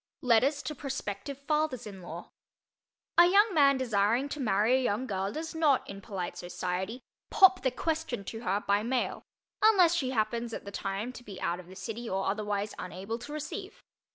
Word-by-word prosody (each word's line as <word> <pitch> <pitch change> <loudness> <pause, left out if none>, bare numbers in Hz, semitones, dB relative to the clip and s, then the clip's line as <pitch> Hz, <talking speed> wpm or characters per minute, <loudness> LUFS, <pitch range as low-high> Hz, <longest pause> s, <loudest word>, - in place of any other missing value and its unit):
LETTERS 260 +4 +3
TO 305 - -3
PROSPECTIVE 270 -2 -5
FATHERS 290 -3 -1
IN 195 -3 -9
LAW 170 0 -8 0.9
A 345 - +9
young 405 +3 +5
man 280 -4 +5
desiring 235 +2 +1
to 295 - -5
marry 220 0 +3
a 260 - +2
young 240 0 0
girl 195 -3 -2
does 320 +4 -5
not, 310 -5 +2
in 200 0 -8
polite 190 -4 -5
society, 185 +6 -4 0.3
"pop 380 -1 +6
the 260 - +2
question" 320 -2 -2
to 225 +3 -6
her 200 -2 0
by 200 +1 +3
mail, 245 +3 -1 0.4
unless 380 -6 +6
she 275 -7 0
happens, 230 0 -1
at - - -8
the 200 - -7
time, 200 +5 -3
to 245 - -10
be 200 -5 -9
out 175 +1 -1
of 180 - -12
the 185 - -12
city 225 +4 -5
or 195 +1 -1
otherwise 205 0 -1
unable 195 +6 -5
to 245 +5 -9
"receive." 380 +10 -6
235 Hz, 185 wpm, -30 LUFS, 200-285 Hz, 0.9 s, A